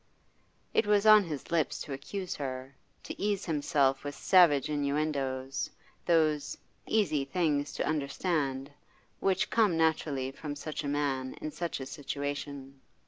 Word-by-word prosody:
It 215 - +2
was 210 0 +3
on 215 -2 +8
his 150 -3 -6
lips 165 -3 +1
to 145 - -5
accuse 185 +7 -5
her, 130 -1 -5 0.3
to - - -7
ease 205 -1 0
himself 145 -4 +1
with 145 -1 -5
savage 165 -7 +5
innuendoes, 140 -3 -1 0.4
those 155 -4 +2 0.3
'easy 160 -10 +2
things 145 -1 0
to - - -2
understand' 140 -2 -1 0.5
which 190 -1 +1
come 210 -7 +3
naturally 155 -5 +1
from 145 +1 -6
such 155 +1 -5
a - - -3
man 140 -2 -1
in 155 - -4
such 170 -1 -3
a 130 - -5
situation. 140 -1 -5
145 Hz, 140 wpm, -30 LUFS, 140-165 Hz, 0.5 s, on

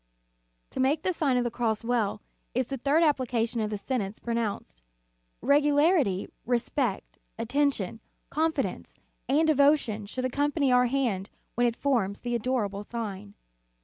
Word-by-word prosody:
To - - -6
make 285 +4 +2
the 370 - +1
Sign 280 -6 +1
of 245 - +2
the 240 - -2
Cross 225 -2 -1
well, 230 -4 0 0.3
is 255 +1 +2
the 270 +3 -4
third 285 +6 +3
application 245 -6 +1
of 215 - -1
the 210 - -3
sentence 205 -2 -3
pronounced. 215 - -3 0.6
Regularity, 290 - +3 0.2
respect, 240 -2 -1 0.2
attention, 230 -4 0 0.3
confidence, 320 +2 -1 0.3
and 300 +4 +4
devotion 280 -8 +3
should 255 +4 -3
accompany 285 +1 +1
our 250 0 +5
hand 235 -7 -1 0.2
when 245 0 +2
it 235 - -1
forms 230 -9 0
the 240 -1 -3
adorable 215 -4 -1
sign. 205 -3 -6
245 Hz, 140 wpm, -28 LUFS, 215-280 Hz, 0.6 s, our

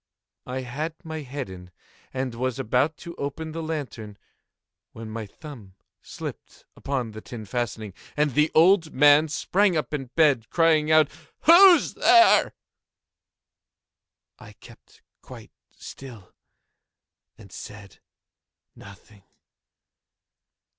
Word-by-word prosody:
I 130 +1 -4
had 150 +6 -5
my 160 -2 -6
head 140 -1 -6
in, 90 -1 -12 0.4
and 130 -2 -4
was 125 +1 -3
about 135 +5 0
to 170 - -7
open 155 +3 -5
the 165 +1 -6
lantern, 135 -10 -6 0.8
when 110 -1 -9
my 110 -1 -6
thumb 110 - -13 0.3
slipped - - -10
upon 130 -5 -4
the 110 0 -10
tin 110 -2 -9
fastening, 110 -3 -4 0.2
and 150 -1 +1
the 150 +4 +2
old 165 0 +4
man 145 +3 +5
sprang 185 +4 +1
up 155 - -4
in 140 -3 -3
bed, 140 -9 +2
crying 160 -2 +2
out—"Who's 225 - +4
there?" 350 -1 +4 1.8
I - - -14
kept - - -19 0.2
quite - - -13 0.2
still 115 -9 -12 1.0
and 100 -3 -16
said 100 -2 -11 0.8
nothing. 100 +1 -16
140 Hz, 110 wpm, -24 LUFS, 115-160 Hz, 1.8 s, man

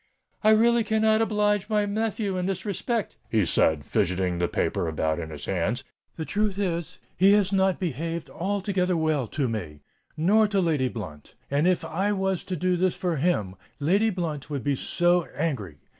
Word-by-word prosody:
"I 215 - +5
really 230 +2 +5
cannot 220 0 +2
oblige 210 -2 +1
my 210 -1 +2
nephew 210 -1 -1
in 180 0 -1
this 190 0 -3
respect," 215 +2 -2
he 110 -4 +2
said, 80 -2 +2
fidgetting 90 +1 0
the 85 - +1
paper 85 - -1
about 80 0 -1
in 80 -1 -5
his 75 -2 -7
hands. 100 +7 -1 0.3
"The 160 - -4
truth 205 +1 -1
is—he 180 +1 +1
has 205 -2 +3
not 190 -1 +3
behaved 165 -1 -3
altogether 190 -1 -1
well 155 -6 0
to 140 +3 -1
me—nor 115 - -1
to 200 -1 0
Lady 155 -7 +1
Blunt;—and 115 - -4
if 180 -3 +1
I 195 +6 0
was 190 -2 -1
to 185 - -3
do 180 +1 +1
this 185 0 +1
for 175 -3 -1
him, 135 - 0 0.2
Lady 195 +10 +3
Blunt 165 -8 -4
would 140 -4 -3
be 145 -1 +1
so 175 +4 +1
angry. 120 - -2
175 Hz, 170 wpm, -26 LUFS, 130-200 Hz, 0.3 s, I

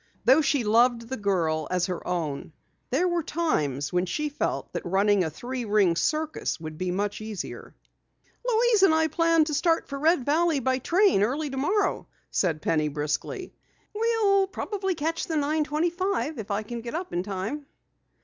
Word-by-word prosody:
Though 315 - +6
she 280 -3 +1
loved 230 +2 +3
the 265 - -2
girl 170 - 0
as 180 -1 +1
her 180 -2 -5
own, 160 -4 -3 0.4
there 320 +9 +2
were 345 -1 +1
times 155 - -1
when 180 +1 +1
she 300 - -2
felt 290 - -3
that - - -3
running 195 +2 +2
a 160 - -1
three 245 - -5
ring 205 -5 +3
circus 310 - -1
would 155 -1 -7
be 185 +3 -3
much 200 +4 -2
easier. 215 -3 -7 0.7
"Louise 475 -3 +3
and 385 -5 +6
I 320 0 +2
plan 330 0 +3
to 305 - -3
start 330 +3 +1
for 275 - -5
Red 315 -3 +3
Valley 315 +1 +2
by 260 0 0
train 360 - +3
early 275 +7 0
tomorrow," 365 +10 0 0.2
said 160 -5 0
Penny 155 -2 +1
briskly. 150 - -3 0.4
"We'll 420 -3 +2
probably 385 -1 -3
catch 325 +1 -2
the 325 - -2
9:25 310 +2 0
if 215 - -6
I 205 +1 -1
can 235 +2 -6
get 235 +5 -6
up 355 +2 -4
in 175 - 0
time." 205 +10 -4
270 Hz, 170 wpm, -26 LUFS, -, 0.7 s, Though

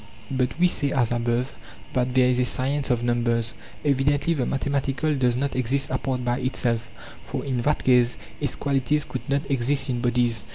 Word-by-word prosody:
But 130 0 -1
we 180 - +5
say, 145 -5 +2
as 120 -4 +1
above, 120 +2 -1 0.4
that 125 0 0
there 130 -1 +5
is 125 0 +2
a 125 - +3
science 135 +3 0
of 120 -1 +1
numbers. 120 -1 +1 0.3
LEvi 135 -2 +2
dently 145 +4 +1
the 130 -4 -1
mathematical 140 +2 -1
does 125 -3 +1
not 140 +1 -2
exist 130 +2 -1
apart 130 -1 -2
by 120 +1 0
itself, 120 -2 -1 0.3
for - - -5
in 130 -3 -1
that 150 +5 0
case 125 -2 +3 0.2
its 145 -4 -1
qualities 140 +1 0
could - - -7
not 140 +1 +1
exist 135 +1 +3
in 120 -1 -2
bodies. 120 -3 +1
130 Hz, 190 wpm, -24 LUFS, 120-140 Hz, 0.4 s, we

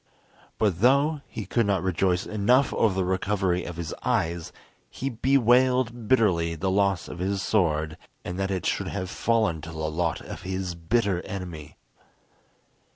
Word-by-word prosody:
But 100 -5 +1
though 140 +5 +3
he 110 -3 -6
could 115 +3 +1
not 95 -3 +1
rejoice 95 +1 +1
enough 120 +6 +2
over 110 -5 +2
the 95 -1 0
recovery 95 -1 0
of 85 - -6
his 85 -3 -4
eyes, 85 0 -1 0.4
he 135 +1 -4
bewailed 125 -1 +2
bitterly 90 -10 +2
the 95 +4 -1
loss 100 -2 +1
of 90 - -8
his 95 +1 -1
sword, 80 -5 +1 0.3
and 90 +2 -4
that 95 0 0
it 95 -3 -2
should - - 0
have 95 -2 -4
fallen 110 -10 +1
to 80 - -8
the 80 - -8
lot 80 +1 -1
of - - -8
his 95 -1 -3
bitter 90 +2 0
enemy. 85 -5 -7
95 Hz, 160 wpm, -26 LUFS, 85-115 Hz, 0.4 s, though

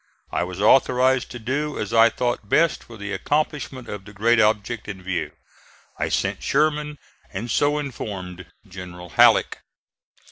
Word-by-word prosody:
I - - 0
was 90 +1 -6
authorized 130 +3 +3
to 120 - -7
do 140 +6 -3
as 105 +2 -4
I 115 0 +7
though 120 +1 -1
best 155 +11 +2
for 115 - -12
the 105 -1 -5
accomplishment 145 -4 -2
of 105 -2 -6
the 105 +1 -13
great 115 +3 +3
object 110 +1 +1
in 95 -3 -7
view. 95 -1 -2 0.7
I - - 0
sent - - -1
Sherman 150 0 0 0.3
and 110 +5 -5
so 145 +1 +2
informed 95 - -6 0.2
General 90 -2 -9
Halleck. - - +4
115 Hz, 150 wpm, -23 LUFS, 100-135 Hz, 0.7 s, I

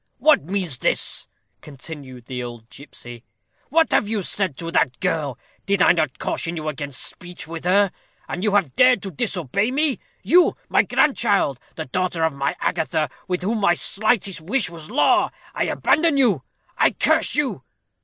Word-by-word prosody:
"What 305 - +4
means 180 -7 -2
this?" - - 0 0.3
continued 135 -3 -10
the 125 0 -5
old 120 -2 -9
gipsy. 120 -4 -11 0.5
"What 320 +3 +3
have - - +3
you 210 -2 -2
said 185 -6 -1
to 165 0 -5
that 130 -6 +1
girl? 145 -6 -1 0.3
Did 200 -2 +3
I - - +7
not 155 -6 0
caution 165 +1 -3
you 155 -1 -5
against 140 -2 -5
speech 175 -3 -9
with 165 +1 -7
her? 195 +1 +4 0.4
and 180 - -4
you 210 -2 +2
have 175 -11 +1
dared 255 -4 +5
to 195 - -5
disobey 180 - -1
me. 285 +1 0 0.2
You, 355 0 +4
my - - +5
grandchild 205 - +2 0.2
the - - -5
daughter 175 +3 -1
of 160 -2 +2
my 140 0 -1
Agatha, 155 -3 0 0.2
with 180 -1 -2
whom 220 +4 0
my 195 -4 +3
slightest 200 -2 0
wish 195 +2 -1
was 160 -2 -10
law. 255 +7 +3 0.2
I - - 0
abandon 315 -1 +2
you! 225 - +3 0.4
I - - +4
curse - - +2
you!" 250 - -1
175 Hz, 170 wpm, -22 LUFS, 145-210 Hz, 0.5 s, I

